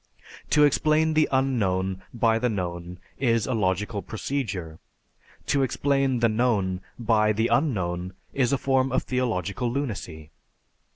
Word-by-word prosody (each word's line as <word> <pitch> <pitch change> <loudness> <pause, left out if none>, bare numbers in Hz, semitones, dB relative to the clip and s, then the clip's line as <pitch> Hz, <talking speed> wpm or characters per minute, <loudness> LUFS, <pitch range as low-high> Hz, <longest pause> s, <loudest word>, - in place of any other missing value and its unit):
To 150 - +5
explain 155 +2 +3
the 155 0 +3
unknown 95 -9 0
by 115 -1 +2
the 125 +1 +1
known 90 -3 -4 0.2
is 115 -4 +2
a 130 - -2
logical 105 0 -1
procedure; 100 - -4 0.7
to 140 - +1
explain 135 -1 +1
the 120 - +5
known 110 -5 0 0.2
by 110 -2 +2
the 110 +3 0
unknown 90 - 0 0.2
is 130 -3 +1
a 140 - +2
form 135 0 +1
of 130 - +1
theological 120 -3 -1
lunacy. 100 - -5
115 Hz, 130 wpm, -25 LUFS, 95-130 Hz, 0.7 s, To